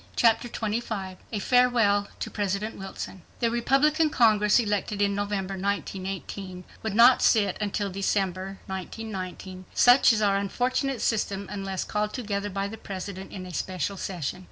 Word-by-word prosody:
Chapter 230 Hz, 0 st, +3 dB
25 215 Hz, -4 st, -3 dB
A 220 Hz, -, -2 dB
Farewell 225 Hz, -3 st, +3 dB
to -, -, -3 dB
President 205 Hz, +1 st, -2 dB
Wilson 190 Hz, -1 st, -7 dB, 0.2 s
The 230 Hz, -2 st, +1 dB
Republican 290 Hz, +6 st, +3 dB
Congress 215 Hz, -6 st, +4 dB
elected 210 Hz, -3 st, 0 dB
in 200 Hz, 0 st, +2 dB
November, 200 Hz, -1 st, -2 dB
1918, 190 Hz, -1 st, -4 dB, 0.2 s
would 220 Hz, -2 st, -3 dB
not 240 Hz, +3 st, +7 dB
sit 215 Hz, -3 st, +3 dB
until 205 Hz, -1 st, -1 dB
December, 195 Hz, 0 st, -1 dB
1919—such 190 Hz, +4 st, +1 dB
is 225 Hz, -, +1 dB
our 200 Hz, -1 st, +3 dB
unfortunate 255 Hz, +6 st, -1 dB
system—unless 195 Hz, -3 st, -2 dB
called 210 Hz, 0 st, -2 dB
together 205 Hz, -5 st, -2 dB
by 195 Hz, 0 st, -2 dB
the 220 Hz, +2 st, -8 dB
President 190 Hz, 0 st, -7 dB
in 185 Hz, -2 st, -7 dB
a 180 Hz, -, -9 dB
special 185 Hz, +3 st, -2 dB
session. 180 Hz, -3 st, -4 dB
200 Hz, 135 wpm, -27 LUFS, 195-225 Hz, 0.2 s, not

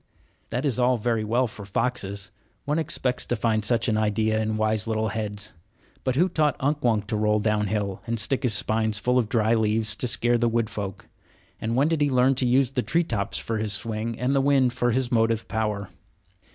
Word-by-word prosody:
That 125 Hz, +5 st, -2 dB
is 130 Hz, -4 st, 0 dB
all 125 Hz, 0 st, +3 dB
very 115 Hz, 0 st, 0 dB
well 120 Hz, +4 st, +1 dB
for 110 Hz, -3 st, -8 dB
foxes. 100 Hz, -2 st, -2 dB, 0.3 s
One 150 Hz, +2 st, 0 dB
expects 125 Hz, -5 st, 0 dB
to 120 Hz, -, 0 dB
find 110 Hz, -1 st, 0 dB
such 115 Hz, +3 st, +1 dB
an 110 Hz, -2 st, +1 dB
idea 110 Hz, +1 st, +1 dB
in 110 Hz, 0 st, -1 dB
wise 110 Hz, 0 st, 0 dB
little 110 Hz, 0 st, 0 dB
heads. 105 Hz, -1 st, -4 dB, 0.5 s
But 130 Hz, -1 st, 0 dB
who 175 Hz, +7 st, +3 dB
taught 155 Hz, -5 st, +1 dB
Unk 145 Hz, +2 st, -1 dB
Wunk 110 Hz, -4 st, +2 dB
to 110 Hz, -, -2 dB
roll 105 Hz, 0 st, +2 dB
downhill 105 Hz, -2 st, -1 dB
and 115 Hz, 0 st, -1 dB
stick 135 Hz, +4 st, +1 dB
his 120 Hz, -5 st, +3 dB
spines 110 Hz, +1 st, 0 dB
full 125 Hz, +4 st, +1 dB
of 115 Hz, -4 st, -1 dB
dry 110 Hz, 0 st, +2 dB
leaves 110 Hz, -1 st, +1 dB
to 125 Hz, -, 0 dB
scare 120 Hz, 0 st, +2 dB
the 120 Hz, 0 st, +2 dB
wood 115 Hz, -1 st, -1 dB
folk? 100 Hz, -2 st, -6 dB, 0.5 s
And 115 Hz, +1 st, -2 dB
when 140 Hz, +4 st, +3 dB
did 160 Hz, -2 st, 0 dB
he 145 Hz, -, +3 dB
learn 130 Hz, 0 st, +3 dB
to 130 Hz, -, +2 dB
use 130 Hz, +1 st, +3 dB
the 130 Hz, -, 0 dB
tree 150 Hz, +9 st, +1 dB
tops 115 Hz, -8 st, -2 dB
for 115 Hz, -1 st, -3 dB
his 110 Hz, -1 st, -1 dB
swing 110 Hz, +2 st, -2 dB
and 130 Hz, +3 st, 0 dB
the 135 Hz, -, +3 dB
wind 135 Hz, -3 st, +3 dB
for 120 Hz, 0 st, 0 dB
his 125 Hz, +1 st, 0 dB
motive 115 Hz, -1 st, +1 dB
power? 105 Hz, -3 st, -2 dB
115 Hz, 215 wpm, -25 LUFS, 110-125 Hz, 0.5 s, all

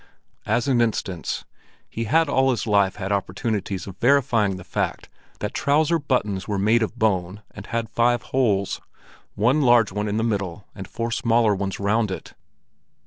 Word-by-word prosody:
As 120 Hz, +3 st, +1 dB
an 125 Hz, -3 st, +3 dB
instance; 100 Hz, -6 st, -2 dB, 0.4 s
he 115 Hz, -, -4 dB
had 160 Hz, +7 st, +3 dB
all 135 Hz, -1 st, +2 dB
his 125 Hz, -4 st, 0 dB
life 100 Hz, -3 st, +2 dB
had 100 Hz, -1 st, -4 dB
opportunities 100 Hz, 0 st, -2 dB
of 95 Hz, -1 st, -10 dB
verifying 120 Hz, -6 st, +3 dB
the 95 Hz, -, -9 dB
fact 90 Hz, -, -3 dB, 0.3 s
that 105 Hz, -, -3 dB
trouser 155 Hz, +4 st, +2 dB
buttons 105 Hz, -9 st, -1 dB
were 105 Hz, -2 st, -1 dB
made 110 Hz, +4 st, +3 dB
of 110 Hz, +2 st, -2 dB
bone 100 Hz, -2 st, 0 dB
and 105 Hz, 0 st, -10 dB
had 115 Hz, -1 st, -2 dB
five 120 Hz, +1 st, +1 dB
holes, 105 Hz, -7 st, +1 dB, 0.5 s
one 125 Hz, +8 st, +2 dB
large 120 Hz, -5 st, +4 dB
one 105 Hz, +2 st, -2 dB
in 105 Hz, +1 st, -1 dB
the 110 Hz, -, 0 dB
middle 100 Hz, -4 st, -2 dB
and 95 Hz, -, -8 dB
four 115 Hz, 0 st, -4 dB
smaller 115 Hz, -2 st, +2 dB
ones 100 Hz, -1 st, -3 dB
round 105 Hz, +2 st, +1 dB
it. 95 Hz, -, -7 dB
110 Hz, 170 wpm, -23 LUFS, 100-120 Hz, 0.5 s, large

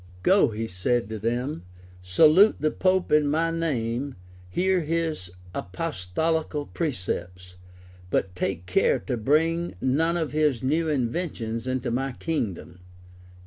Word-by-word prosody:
"Go," 190 Hz, -, +5 dB
said 115 Hz, +5 st, 0 dB
he -, -, -13 dB
to 110 Hz, -1 st, -5 dB
them, 120 Hz, -, -2 dB, 0.4 s
"salute 155 Hz, -, +6 dB
the 155 Hz, 0 st, +1 dB
pope 185 Hz, -2 st, +1 dB
in 150 Hz, -1 st, +4 dB
my 165 Hz, +3 st, +1 dB
name; 135 Hz, -5 st, -2 dB, 0.3 s
hear 185 Hz, -, +2 dB
his 160 Hz, -, -2 dB, 0.2 s
apostolical 155 Hz, -, -2 dB
precepts; 90 Hz, -, -4 dB, 0.6 s
but 90 Hz, 0 st, 0 dB
take 90 Hz, -1 st, -2 dB
care 90 Hz, -, +3 dB
to -, -, -2 dB
bring 160 Hz, -, +1 dB
none 160 Hz, -, +1 dB
of 160 Hz, -3 st, -2 dB
his 150 Hz, -5 st, +1 dB
new 160 Hz, +5 st, +1 dB
inventions 120 Hz, -4 st, -2 dB
into 130 Hz, -1 st, -1 dB
my 135 Hz, +2 st, -1 dB
kingdom." 110 Hz, -, -4 dB
140 Hz, 125 wpm, -26 LUFS, 115-165 Hz, 0.6 s, salute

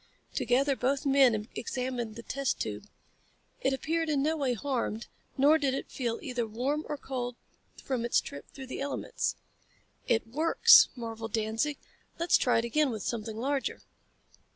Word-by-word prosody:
Together 270 Hz, +3 st, +2 dB
both 270 Hz, +3 st, 0 dB
men 260 Hz, -6 st, +4 dB
examined 245 Hz, -2 st, -3 dB
the 235 Hz, -, -8 dB
test 275 Hz, +2 st, -1 dB
tube. -, -, -4 dB, 0.7 s
It 265 Hz, -, +1 dB
appeared 320 Hz, +4 st, -1 dB
in 285 Hz, -2 st, +1 dB
no 315 Hz, +2 st, +1 dB
way 270 Hz, -5 st, 0 dB
harmed, 235 Hz, -2 st, -2 dB, 0.3 s
nor 295 Hz, +4 st, +5 dB
did 270 Hz, -3 st, +1 dB
it -, -, -5 dB
feel 235 Hz, -3 st, -2 dB
either 250 Hz, -6 st, -2 dB
warm 265 Hz, +8 st, -1 dB
or 295 Hz, -, -2 dB
cold 250 Hz, -3 st, -4 dB, 0.5 s
from 255 Hz, -4 st, -1 dB
its 235 Hz, -, +3 dB
trip 140 Hz, -, -9 dB
through 270 Hz, -, -9 dB
the 260 Hz, -, -6 dB
elements. 280 Hz, 0 st, -2 dB, 0.7 s
"It 225 Hz, -2 st, +2 dB
works!" 305 Hz, +9 st, +6 dB
marveled 225 Hz, -2 st, -6 dB
Danzig. 225 Hz, +7 st, 0 dB, 0.4 s
"Let's 340 Hz, +1 st, +3 dB
try 245 Hz, -, +3 dB
it 230 Hz, -, +1 dB
again 295 Hz, +5 st, +2 dB
with 220 Hz, -4 st, -4 dB
something 220 Hz, -2 st, -3 dB
larger." 270 Hz, +3 st, -2 dB
260 Hz, 155 wpm, -30 LUFS, 230-280 Hz, 0.7 s, works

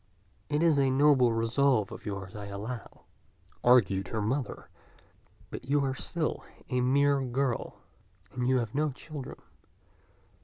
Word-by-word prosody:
"It 150 Hz, +2 st, +1 dB
is 160 Hz, -4 st, +4 dB
a 135 Hz, -1 st, +3 dB
noble 135 Hz, -2 st, +4 dB
resolve 115 Hz, 0 st, +2 dB
of -, -, -9 dB
yours, 95 Hz, -2 st, -5 dB
I 105 Hz, -1 st, -6 dB
allow," 105 Hz, +5 st, -7 dB, 0.6 s
argued 100 Hz, -7 st, +4 dB
her 110 Hz, -, -3 dB
mother; 125 Hz, +6 st, -2 dB, 0.8 s
"but -, -, -7 dB
you 140 Hz, +1 st, +2 dB
are 135 Hz, -, -1 dB
still 155 Hz, +4 st, -3 dB, 0.3 s
a 125 Hz, 0 st, +1 dB
mere 140 Hz, +2 st, +3 dB
girl, 130 Hz, -1 st, -2 dB, 0.5 s
and 125 Hz, 0 st, -2 dB
you 130 Hz, 0 st, +3 dB
have 115 Hz, -3 st, -2 dB
no 150 Hz, +2 st, +1 dB
children. 140 Hz, 0 st, -8 dB
130 Hz, 140 wpm, -29 LUFS, 115-140 Hz, 0.8 s, is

